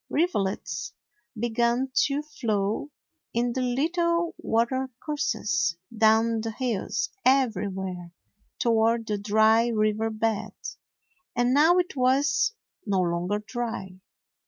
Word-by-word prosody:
Rivulets 195 - -1 0.5
began 235 +3 +1
to 285 +1 -1
flow 225 -4 -2 0.5
in 240 0 +1
the 260 - -1
little 335 +7 0
watercourses 230 - -1 0.2
down 220 +1 +3
the 225 - -3
hills 225 -2 -2
everywhere, 190 -9 0 0.5
toward 230 0 +2
the 210 -2 -2
dry 220 +3 +4
river 215 -1 +1
bed. 220 -1 -2 0.8
And 245 +1 +2
now 315 +5 +5
it 360 -1 0
was 275 - +2 0.3
no 200 -3 0
longer 180 +4 -1
dry. 225 -5 -5
225 Hz, 100 wpm, -26 LUFS, 210-260 Hz, 0.8 s, now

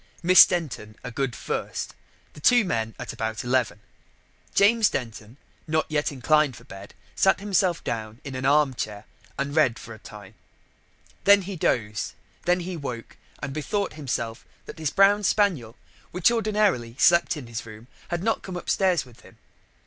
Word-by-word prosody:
Miss 185 +2 +9
Denton 140 -11 -4
a 125 - -6
good 135 0 -2
first, - - -4 0.4
the - - -13
two 240 +8 +4
men 115 - -2
at - - -6
about 110 -1 -3
eleven. 125 -4 0 0.7
James 215 +1 +5
Denton, 115 0 -6 0.3
not 155 0 +1
yet 150 -1 0
inclined 145 0 +2
for 115 - -14
bed, 100 -5 -12 0.2
sat 190 - +3
him 200 0 -7 0.3
down 110 0 -5
in 140 - -7
an 130 0 -5
arm 140 0 +3
chair 105 -3 -5 0.3
and 140 +1 -3
read 130 -7 +3
for 115 - -10
a 110 - -13
time. 105 -2 -12 0.9
Then 200 -1 +6
he 195 +1 -6
dozed, 110 -9 -1
and - - -33
then 180 +1 +3
he 180 +1 -5
woke, 125 -7 -7 0.3
and 135 - -4
bethought 200 +7 -2
himself 120 -6 -4 0.2
that - - -10
his 155 -3 -1
brown 200 +4 +4
spaniel, 175 - +1 0.3
which 180 +5 +2
ordinarily 210 - 0
slept 170 0 +4
in 140 - -8
his 115 0 -7
room, 110 +1 -11 0.2
had 175 0 -3
not 225 +1 0
come 185 -2 -6
upstairs 180 -2 +1
with 120 -2 -18
him. - - -18
140 Hz, 170 wpm, -25 LUFS, 115-180 Hz, 0.9 s, Miss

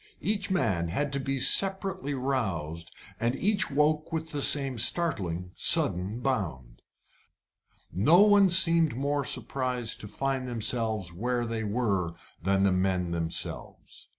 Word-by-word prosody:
Each 200 -1 -1
man 100 - 0
had 140 - -3
to 140 - 0
be 135 0 -3
separately 190 -1 +1
roused, 95 - -3 0.3
and 120 +3 -1
each 200 +4 0
woke 150 +3 0
with 160 -1 -4
the 145 - -3
same 135 -4 +2
startling, 95 - +2
sudden 95 +7 +2
bound. 85 - -4 1.1
No 155 - +4
one 205 -2 +5
seemed 165 -5 +4
more 140 +2 -1
surprised 125 -1 -2
to 105 - -7
find 130 +4 -3
themselves 110 -5 -2
where 120 +6 -2
they 115 -1 -4
were 100 -6 -2 0.3
than 95 +2 +1
the 100 - +3
men 90 -1 -1
themselves. 85 -1 -4
125 Hz, 130 wpm, -27 LUFS, 95-145 Hz, 1.1 s, one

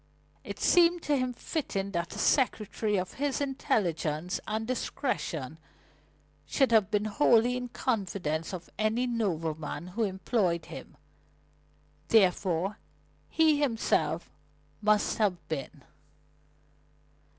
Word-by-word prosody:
It - - -7
seemed 345 -1 +4
to 295 - +2
him 255 -2 0
fitting 230 - -3
that 170 0 -3
a - - -7
secretary 215 -3 +1
of 185 0 -3
his 285 -2 0
intelligence 180 - -1
and 220 +1 -2
discretion 170 - -3 0.9
should 270 -4 +2
have 215 -4 +4
been 210 -1 +1
wholly 235 +1 +4
in 250 0 -3
the - - -8
confidence 180 - -2
of 180 -3 -7
any 220 +3 +1
nobleman 165 -8 -2
who 210 +6 -4
employed 190 -3 0
him. - - -10 1.1
Therefore 190 -1 +2 0.5
he 315 -2 +4
himself 170 - 0 0.5
must 210 +1 +2
have 200 -5 +2
been. 145 -5 -5
210 Hz, 110 wpm, -29 LUFS, 175-245 Hz, 1.1 s, seemed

